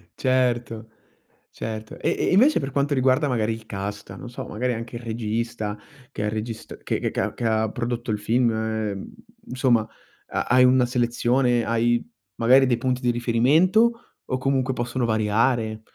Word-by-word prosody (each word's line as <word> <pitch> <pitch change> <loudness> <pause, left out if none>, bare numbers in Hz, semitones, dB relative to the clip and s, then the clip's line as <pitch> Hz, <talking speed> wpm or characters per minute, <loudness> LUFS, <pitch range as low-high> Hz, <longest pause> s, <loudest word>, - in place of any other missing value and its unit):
Certo, 120 -3 0 0.6
certo. 110 -1 -7
E - - 0
e - - 0
invece 255 +11 +5
per 135 -1 -4
quanto 140 +2 0
riguarda 130 +2 +2
magari 115 -3 0
il 110 0 -9
cast, 100 0 -6
non 125 - -8
so, 130 +1 -7
magari 125 +3 -2
anche 115 +1 -6
il - - -9
regista, 115 -1 -3 0.4
che 105 - -4
ha - - 0
regist 110 +1 -6
che - - -1
che - - -1
ca - - -2
che - - -7
ha 110 -1 +1
prodotto 120 -1 -3
il 105 - -1
film, 120 +4 +2
mhmm, 110 - -3 0.4
insomma, 125 -4 +2 0.4
ha - - -2
hai 125 +1 +5
una 125 0 +5
selezione, 120 0 +1
hai 120 +1 +1 0.3
magari 130 +3 +5
dei 120 -2 +2
punti 130 0 -1
di 125 - +1
riferimento 160 - +2
o 130 - -2
comunque 130 0 0
possono 120 0 -2
variare? 110 +1 +1
120 Hz, 165 wpm, -24 LUFS, 110-130 Hz, 0.6 s, invece